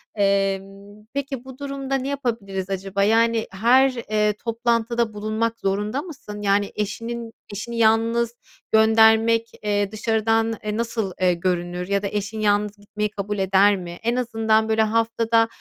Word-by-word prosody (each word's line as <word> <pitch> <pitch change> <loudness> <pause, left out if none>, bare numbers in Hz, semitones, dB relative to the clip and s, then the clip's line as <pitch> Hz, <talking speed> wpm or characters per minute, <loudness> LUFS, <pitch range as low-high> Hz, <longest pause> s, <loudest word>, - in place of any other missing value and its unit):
Emm, 195 +1 -1
peki, 275 -2 -4
bu 265 -1 -10
durumda 275 -1 -3
ne 265 0 -2
yapabiliriz 225 -9 -3
acaba? 195 +1 -1
Yani, 225 +1 +3
her, 240 +7 +4 0.2
eee, 210 0 +2
toplantıda 235 -1 0
bulunmak 220 +2 -2
zorunda 210 +7 -1
mısın? 275 - -9
Yani, 200 0 +1
eşinin 230 +2 -4 0.2
eşini 230 +4 -5
yalnız 230 +1 +2 0.4
göndermek, 225 +1 +5
eee, 205 -1 0
dışarıdan, 225 +1 +1
eee, 210 0 -2
nasıl, 225 -4 -2
eee, 180 -1 +4
görünür 175 0 -2
ya 200 0 +1
da 200 - -2
eşin 210 +2 -4
yalnız 210 0 +1
gitmeyi 210 +1 -3
kabul 205 +1 -3
eder 195 +2 +4
mi? 175 -2 -7
En 235 +1 +1
azından, 225 -3 +1
böyle, 220 0 +3
haftada, 225 +1 +2
220 Hz, 140 wpm, -23 LUFS, 200-230 Hz, 0.4 s, göndermek